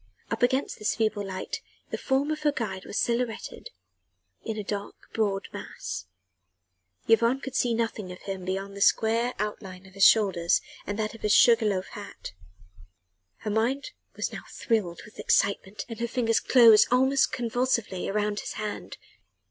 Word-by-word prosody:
Up 230 Hz, -, -2 dB
against 260 Hz, +2 st, +1 dB
this 210 Hz, -, 0 dB
feeble 215 Hz, -2 st, 0 dB
light 190 Hz, -1 st, -5 dB, 0.3 s
the -, -, -2 dB
form 275 Hz, +3 st, +1 dB
of 310 Hz, -, -2 dB
her 300 Hz, -1 st, +3 dB
guide 195 Hz, -8 st, -4 dB
was -, -, -5 dB
silhouetted 235 Hz, -, -2 dB, 0.7 s
in 220 Hz, -1 st, -4 dB
a 210 Hz, -, -3 dB
broad, 200 Hz, 0 st, -4 dB, 0.2 s
dark 200 Hz, -3 st, -1 dB
mass. -, -, -6 dB, 1.0 s
Yvonne 230 Hz, +3 st, +4 dB
could 270 Hz, -1 st, -7 dB
see 240 Hz, -3 st, +2 dB
nothing 225 Hz, -4 st, -2 dB
of 180 Hz, -, -9 dB
him 190 Hz, -2 st, -5 dB
beyond 195 Hz, +2 st, -3 dB
the 200 Hz, -, -7 dB
square 230 Hz, +4 st, +3 dB
outline 195 Hz, -3 st, -5 dB
of 190 Hz, -, -16 dB
his 195 Hz, 0 st, +1 dB
shoulders 190 Hz, -7 st, +5 dB, 0.3 s
and 205 Hz, -, -3 dB
that 215 Hz, 0 st, -2 dB
of 225 Hz, -, -12 dB
his 210 Hz, -1 st, +3 dB
sugar 230 Hz, -2 st, +6 dB
loaf 190 Hz, -2 st, 0 dB
hat. 205 Hz, -, -9 dB, 1.1 s
Her 210 Hz, -, -3 dB
mind 250 Hz, -, 0 dB, 0.4 s
now -, -, -6 dB
was -, -, -14 dB
thrilled 200 Hz, -8 st, -1 dB
with 210 Hz, -, -16 dB
excitement 200 Hz, 0 st, +1 dB
and 230 Hz, -2 st, -8 dB
her 235 Hz, -, -1 dB
fingers 230 Hz, -2 st, +1 dB
closed 230 Hz, -4 st, +7 dB
almost 265 Hz, +2 st, +3 dB
convulsively 235 Hz, -5 st, -1 dB
round 210 Hz, +1 st, 0 dB
his -, -, -5 dB
hand. 215 Hz, -1 st, -5 dB
220 Hz, 165 wpm, -27 LUFS, 200-235 Hz, 1.1 s, closed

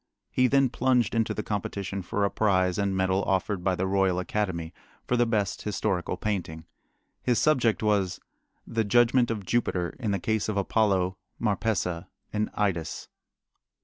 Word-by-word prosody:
He 130 Hz, 0 st, +3 dB
then 135 Hz, 0 st, +3 dB
plunged 125 Hz, -2 st, +2 dB
into 115 Hz, -1 st, +1 dB
the 105 Hz, -, -3 dB
competition 100 Hz, -1 st, -3 dB
for 100 Hz, +3 st, -1 dB
a 100 Hz, -, 0 dB
prize 95 Hz, -3 st, +2 dB
and 100 Hz, -1 st, 0 dB
medal 95 Hz, +1 st, +2 dB
offered 95 Hz, 0 st, 0 dB
by 95 Hz, -1 st, +2 dB
the 90 Hz, -, -1 dB
Royal 95 Hz, -1 st, +2 dB
Academy 90 Hz, -3 st, -2 dB, 0.3 s
for 125 Hz, -, +1 dB
the 120 Hz, -1 st, +3 dB
best 105 Hz, -4 st, 0 dB
historical 100 Hz, -3 st, -1 dB
painting. 85 Hz, -6 st, -3 dB, 0.6 s
His 125 Hz, -2 st, +1 dB
subject 125 Hz, -8 st, +2 dB
was, 100 Hz, -4 st, +1 dB, 0.5 s
"The 115 Hz, -1 st, 0 dB
Judgment 120 Hz, +3 st, +4 dB
of 105 Hz, -4 st, -3 dB
Jupiter 90 Hz, -6 st, 0 dB
in 115 Hz, -4 st, -2 dB
the 100 Hz, -, +1 dB
Case 110 Hz, +3 st, -1 dB
of 105 Hz, -, -1 dB
Apollo, 95 Hz, -2 st, +1 dB, 0.2 s
Marpessa, 100 Hz, -5 st, -1 dB, 0.3 s
and 105 Hz, 0 st, 0 dB
Idas." 85 Hz, -6 st, -2 dB
100 Hz, 155 wpm, -27 LUFS, 95-115 Hz, 0.6 s, Judgment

